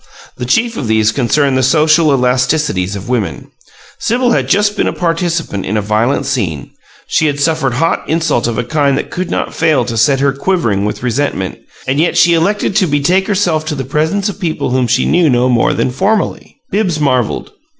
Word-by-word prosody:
The 125 Hz, -, -5 dB
chief 230 Hz, -, +1 dB
of 125 Hz, -, -3 dB
these 110 Hz, -1 st, +2 dB
concerned 135 Hz, +4 st, +1 dB
the 130 Hz, -, +2 dB
social 155 Hz, +4 st, +3 dB
elasticities 125 Hz, -, +1 dB
of 100 Hz, -1 st, -7 dB
women. 105 Hz, -, -3 dB, 0.5 s
Sibyl 245 Hz, +1 st, +1 dB
had -, -, 0 dB
just 205 Hz, 0 st, +2 dB
been -, -, 0 dB
a -, -, -1 dB
participant 165 Hz, -, -2 dB
in 105 Hz, +3 st, -2 dB
a -, -, +1 dB
violent 110 Hz, +5 st, 0 dB
scene; 90 Hz, -, -3 dB, 0.3 s
she 155 Hz, -, +1 dB
had 145 Hz, -1 st, -2 dB
suffered 145 Hz, -4 st, 0 dB
hot 165 Hz, +5 st, 0 dB
insult 160 Hz, -7 st, 0 dB
of 120 Hz, -, -3 dB
a 125 Hz, -, 0 dB
kind 140 Hz, +1 st, +1 dB
that -, -, -4 dB
could 185 Hz, 0 st, -3 dB
not -, -, -2 dB
fail 160 Hz, -2 st, +1 dB
to 115 Hz, -, -4 dB
set 130 Hz, +5 st, +3 dB
her 140 Hz, 0 st, +2 dB
quivering 140 Hz, -, 0 dB
with 105 Hz, -, -4 dB
resentment; 125 Hz, -7 st, -2 dB, 0.3 s
and 130 Hz, +2 st, 0 dB
yet 170 Hz, -, +1 dB
she 170 Hz, -, +5 dB
elected 195 Hz, +4 st, 0 dB
to 190 Hz, -4 st, +3 dB
betake 170 Hz, +6 st, +1 dB
herself 180 Hz, -6 st, 0 dB
to 155 Hz, -1 st, -3 dB
the 135 Hz, -, -4 dB
presence 160 Hz, -, -1 dB
of 205 Hz, -, -5 dB
people 165 Hz, -8 st, -2 dB
whom 130 Hz, -1 st, +1 dB
she 125 Hz, +3 st, +1 dB
knew 170 Hz, -1 st, +3 dB
no 125 Hz, -1 st, +2 dB
more 120 Hz, -2 st, +2 dB
than -, -, -1 dB
"formally." 200 Hz, -, -1 dB
Bibbs 185 Hz, -6 st, 0 dB
marveled. 130 Hz, -6 st, 0 dB
145 Hz, 200 wpm, -14 LUFS, 125-170 Hz, 0.5 s, she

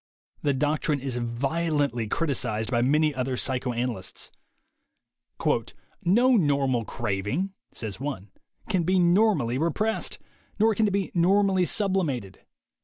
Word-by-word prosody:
The 145 Hz, -2 st, +1 dB
doctrine 150 Hz, +1 st, 0 dB
is 130 Hz, -2 st, -3 dB
violently 135 Hz, +1 st, -1 dB
criticized 120 Hz, -6 st, -1 dB
by 120 Hz, -1 st, +2 dB
many 150 Hz, +4 st, +3 dB
other 130 Hz, -1 st, -2 dB
psychoanalysts. 125 Hz, -6 st, -2 dB, 1.7 s
"No 245 Hz, +8 st, +4 dB
normal 140 Hz, -, +2 dB
craving," 115 Hz, -, -2 dB, 0.2 s
says 110 Hz, -3 st, -6 dB
one, 125 Hz, -9 st, -5 dB, 0.4 s
"can 190 Hz, -5 st, +1 dB
be 185 Hz, +3 st, +2 dB
normally 175 Hz, -, +3 dB
repressed. 210 Hz, +8 st, 0 dB, 0.4 s
Nor 220 Hz, +1 st, +4 dB
can 215 Hz, +1 st, +2 dB
it -, -, 0 dB
be 195 Hz, 0 st, -1 dB
normally 190 Hz, +1 st, +3 dB
sublimated." 170 Hz, -, -1 dB
145 Hz, 110 wpm, -26 LUFS, 120-185 Hz, 1.7 s, No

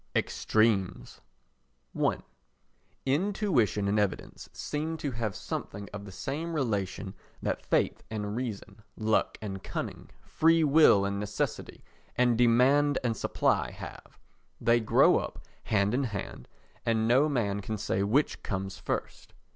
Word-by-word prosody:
Extremes 100 Hz, -, 0 dB, 0.7 s
i -, -, +1 dB, 0.9 s
Intuition 140 Hz, -, +1 dB
and 105 Hz, +1 st, +2 dB
evidence 100 Hz, -3 st, -3 dB
seem 155 Hz, +2 st, -3 dB
to 145 Hz, -3 st, -3 dB
have 110 Hz, -4 st, -3 dB
something 100 Hz, 0 st, -5 dB
of 100 Hz, -1 st, -6 dB
the 100 Hz, -, -9 dB
same 145 Hz, -, -4 dB
relation 100 Hz, -7 st, -2 dB, 0.3 s
that -, -, -2 dB
faith -, -, +1 dB
and 105 Hz, -1 st, -3 dB
reason, 110 Hz, -4 st, -5 dB, 0.2 s
luck 110 Hz, 0 st, +1 dB
and 95 Hz, -2 st, -5 dB
cunning, -, -, -5 dB
freewill 155 Hz, -9 st, +5 dB
and 100 Hz, 0 st, -2 dB
necessity 105 Hz, 0 st, -3 dB, 0.3 s
and 125 Hz, -1 st, +3 dB
demand 130 Hz, +5 st, +4 dB
and 115 Hz, -2 st, 0 dB
supply -, -, +1 dB
have. -, -, -10 dB, 0.4 s
They 115 Hz, +1 st, +3 dB
grow 110 Hz, -, +5 dB
up -, -, -7 dB, 0.2 s
hand 100 Hz, 0 st, +2 dB
in 135 Hz, +2 st, +1 dB
hand 100 Hz, -, -6 dB, 0.4 s
and 110 Hz, -1 st, +1 dB
no 135 Hz, +6 st, +4 dB
man 100 Hz, -7 st, 0 dB
can 110 Hz, +2 st, -4 dB
say 100 Hz, -1 st, -1 dB
which 115 Hz, +9 st, +1 dB
comes 95 Hz, -1 st, -4 dB
first. -, -, -5 dB
110 Hz, 130 wpm, -29 LUFS, 100-135 Hz, 0.9 s, freewill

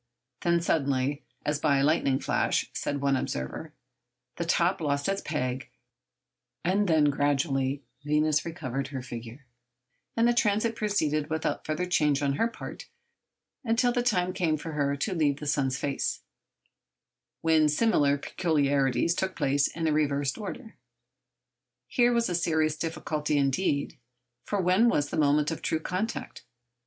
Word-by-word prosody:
Then 170 Hz, -1 st, +2 dB
suddenly—'as 140 Hz, -1 st, -1 dB
by 145 Hz, -2 st, +3 dB
a 135 Hz, -, +2 dB
lightning 140 Hz, -3 st, +2 dB
flash,' -, -, 0 dB
said 145 Hz, 0 st, -2 dB
one 140 Hz, -1 st, +2 dB
observer—the 65 Hz, -, -7 dB
top -, -, +2 dB
lost 140 Hz, -2 st, 0 dB
its 195 Hz, 0 st, 0 dB
peg, 130 Hz, -3 st, -3 dB, 1.0 s
and 200 Hz, +3 st, +2 dB
then 155 Hz, -3 st, +4 dB
gradually 140 Hz, -1 st, 0 dB, 0.2 s
Venus 150 Hz, +1 st, +2 dB
recovered 135 Hz, -5 st, -4 dB
her 135 Hz, -2 st, -6 dB
figure, 120 Hz, +2 st, -8 dB, 0.7 s
and 230 Hz, +1 st, +4 dB
the 240 Hz, -, +4 dB
transit 220 Hz, 0 st, +1 dB
proceeded 155 Hz, -9 st, 0 dB
without 160 Hz, 0 st, -2 dB
further 155 Hz, +4 st, -1 dB
change 150 Hz, -5 st, +2 dB
on 140 Hz, -1 st, +1 dB
her 225 Hz, -, +2 dB
part 235 Hz, -, -9 dB, 0.8 s
until 245 Hz, +1 st, +2 dB
the 245 Hz, 0 st, +1 dB
time 185 Hz, -7 st, +1 dB
came 165 Hz, -4 st, +1 dB
for 160 Hz, +2 st, -6 dB
her 140 Hz, -2 st, 0 dB
to 190 Hz, +8 st, -1 dB
leave 145 Hz, -4 st, +1 dB
the 150 Hz, -, -6 dB
sun's 135 Hz, -3 st, 0 dB
face, 140 Hz, 0 st, -2 dB, 1.2 s
when 160 Hz, -2 st, +4 dB
similar 150 Hz, -5 st, +3 dB
peculiarities 145 Hz, -2 st, +1 dB
took 190 Hz, +1 st, -2 dB
place 140 Hz, +1 st, +2 dB
in 165 Hz, -1 st, -4 dB
a -, -, +2 dB
reversed 145 Hz, -2 st, +1 dB
order. 220 Hz, +2 st, -8 dB, 1.1 s
Here 240 Hz, -1 st, +3 dB
was 235 Hz, -1 st, +2 dB
a 180 Hz, -, -2 dB
serious 160 Hz, -3 st, +1 dB
difficulty 155 Hz, -2 st, -2 dB
indeed. 140 Hz, +1 st, 0 dB, 0.5 s
For 205 Hz, -, -1 dB
when 185 Hz, +6 st, +4 dB
was 145 Hz, -9 st, 0 dB
the -, -, -2 dB
moment 150 Hz, +1 st, +3 dB
of 160 Hz, -, -5 dB
true 160 Hz, -, 0 dB
contact? 185 Hz, +7 st, -4 dB
150 Hz, 145 wpm, -28 LUFS, 140-180 Hz, 1.2 s, then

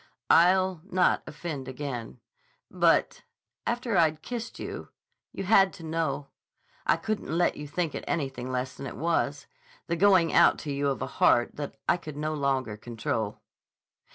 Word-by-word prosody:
"I'll 185 Hz, 0 st, +4 dB
not 185 Hz, -2 st, +2 dB
offend 150 Hz, -4 st, -6 dB
again. 125 Hz, -, -6 dB, 0.5 s
But—after 235 Hz, -3 st, 0 dB
I'd 155 Hz, -2 st, +2 dB
kissed 240 Hz, -1 st, -5 dB
you—you 195 Hz, -, -9 dB
had 195 Hz, -1 st, +5 dB
to 165 Hz, -, -11 dB
know. 160 Hz, -3 st, -2 dB, 0.6 s
I -, -, +4 dB
couldn't 215 Hz, -6 st, -3 dB
let 175 Hz, -, +2 dB
you 150 Hz, -, -7 dB
think 160 Hz, +1 st, -2 dB
it -, -, -5 dB
anything 135 Hz, -5 st, -2 dB
less 130 Hz, +1 st, -2 dB
than 135 Hz, -, -6 dB
it -, -, -8 dB
was, 145 Hz, -3 st, 0 dB, 0.4 s
the 170 Hz, -, -1 dB
going 185 Hz, -2 st, +4 dB
out -, -, +6 dB
to 145 Hz, -, -3 dB
you 140 Hz, 0 st, 0 dB
of 135 Hz, -2 st, -1 dB
a -, -, -7 dB
heart 120 Hz, -, +4 dB
that 145 Hz, -1 st, -5 dB
I -, -, +4 dB
could 155 Hz, -4 st, -9 dB
no 155 Hz, +1 st, -2 dB
longer 135 Hz, -7 st, -1 dB
control." 110 Hz, -2 st, -3 dB
155 Hz, 155 wpm, -28 LUFS, 135-175 Hz, 0.6 s, out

